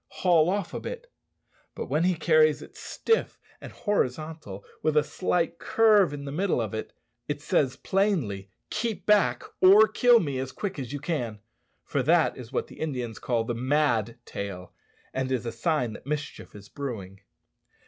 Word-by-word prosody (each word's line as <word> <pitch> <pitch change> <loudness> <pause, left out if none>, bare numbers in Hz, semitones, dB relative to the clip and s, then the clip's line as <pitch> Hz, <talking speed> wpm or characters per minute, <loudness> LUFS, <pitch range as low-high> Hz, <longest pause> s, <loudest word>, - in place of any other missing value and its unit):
haul 170 -3 +3
off 200 -2 -2
a - - -3
bit!" - - -7 0.6
But - - -4
when 160 +3 +1
he 185 -1 +2
carries 155 -2 +3
it - - -15
stiff 455 0 -1 0.2
and - - -9
horizontal, 155 - -3 0.2
with 155 -1 +1
a 150 - +5
slight 170 +2 -1
curve 215 -6 +4
in 145 -1 -6
the 140 - -5
middle 180 0 0
of 110 -3 -3
it, 110 - -4 0.4
it 145 0 -2
says 140 -3 +1
plainly, 150 - 0 0.2
"Keep 220 0 -2
back, 210 -1 +3 0.2
or 200 +4 +8
kill 245 0 +5
me 140 -8 -2
as 130 0 -4
quick 195 -6 -4
as 130 -3 -5
you 145 - -3
can," 125 -8 -3 0.4
for 140 - -1
that 160 +5 +3
is 120 -1 -10
what - - -2
Indians 125 -8 -4
call 120 -2 0
the 120 - -3
mad 125 -3 +1
tail, 95 -3 -6 0.4
and 130 0 -2
is 125 -2 -1
a 115 - -2
sign 120 0 0
that 125 - -12
mischief 150 -6 -5
is 100 -1 -11
brewing. 100 -10 -6
150 Hz, 170 wpm, -27 LUFS, 120-180 Hz, 0.6 s, or